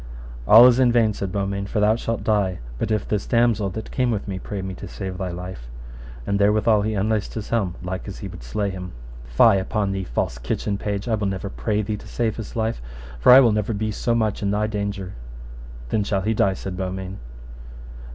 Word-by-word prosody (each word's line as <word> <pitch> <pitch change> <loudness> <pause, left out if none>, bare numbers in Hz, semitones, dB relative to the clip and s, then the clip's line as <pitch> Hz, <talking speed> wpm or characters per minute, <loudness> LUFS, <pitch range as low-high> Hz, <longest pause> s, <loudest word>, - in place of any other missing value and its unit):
All 115 +3 +10
is 125 0 +6
in 125 -2 +5
vain, 115 -3 +3
said 100 -2 -4
Beaumains, 100 0 -2
for 110 - -1
thou 105 +1 +4
shalt 115 -1 -3
die 100 -4 +1 0.2
but - - -1
if 110 -2 0
this 105 -2 -2
damosel 115 -4 +2
that 110 - -6
came 125 -1 +1
with 110 -3 -2
me 95 -2 -4
pray 100 0 -5
me 95 0 -4
to 100 - -8
save 95 0 -6
thy 95 -1 -2
life. 90 -8 -7 0.6
And 100 0 0
therewithal 105 +1 +3
he 110 +1 -1
unlaced 105 +1 -1
his 110 -2 -5
helm 100 -7 0
like 90 +1 -5
as - - -6
he - - -6
would - - -10
slay 100 - -2
him. 90 -1 -7 0.3
Fie 95 - +5
upon 100 +1 -1
thee, 95 0 -2
false - - -2
kitchen 100 +11 -2
page, 100 +1 -3
I 115 - 0
will 105 -2 0
never 95 0 -4
pray 105 -1 -1
thee 105 +1 -3
to - - -12
save 115 -3 -1
his 110 -3 -7
life, 110 - -1 0.4
for - - +6
I 130 +2 +10
will 120 -4 +5
never 105 +1 0
be 110 +1 -2
so 115 +3 0
much 110 -3 0
in 100 - 0
thy 105 +1 +1
danger. 100 -3 -3 0.8
Then 105 - +1
shall 100 -1 -1
he 110 +3 0
die, 100 -3 +2
said 95 0 -6
Beaumains. 95 +1 -5
100 Hz, 220 wpm, -23 LUFS, 95-110 Hz, 0.8 s, All